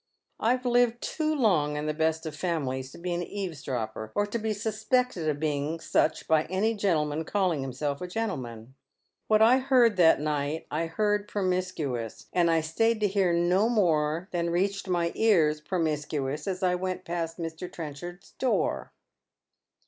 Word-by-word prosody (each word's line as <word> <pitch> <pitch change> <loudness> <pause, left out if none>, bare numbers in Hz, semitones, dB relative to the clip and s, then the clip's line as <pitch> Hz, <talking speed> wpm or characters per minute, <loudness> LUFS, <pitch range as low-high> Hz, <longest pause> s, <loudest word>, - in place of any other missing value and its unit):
I've 250 +3 +1
Uved 245 -1 +3
too 310 +2 -1
long 165 - +2
in 150 - -3
the 155 - 0
best 160 +1 0
of 155 - -4
femilies 135 -7 -2
to - - -12
be 175 +1 -3
an 175 - -1
eavesdropper, 135 - -4
or 205 - +2
to 205 +3 -3
be 220 0 -1
suspected 220 -3 0
of 145 -1 -2
being 150 +1 -1
such 155 -1 0
by 160 -1 +3
any 190 +7 0
gentleman 160 -7 0
calling 180 -5 0
himself 140 +2 -3
a 180 - -3
gentleman. 130 - -4 0.5
What 215 0 +5
I 245 +4 +6
heard 250 -5 +4
that 165 -5 +6
night 150 +1 -2
I 165 +2 -1
heard 205 +4 0
promiscuous, 180 - -2
and 175 -2 +3
I 165 -1 +3
stayed 220 +9 +1
to 210 - +4
hear 195 -2 +2
no 175 +6 +3
more 165 -6 +1
than 170 -1 -1
reached 195 +3 0
my 170 -2 +1
ears 160 -9 +3
promiscuous 150 -4 -2
as 190 0 -3
I 180 -1 +3
went 185 0 -3
past 165 -1 -3
Mr. 165 +1 -6
Trenchard's 170 +3 -8
door." 260 -2 -1
175 Hz, 165 wpm, -28 LUFS, 150-205 Hz, 0.5 s, I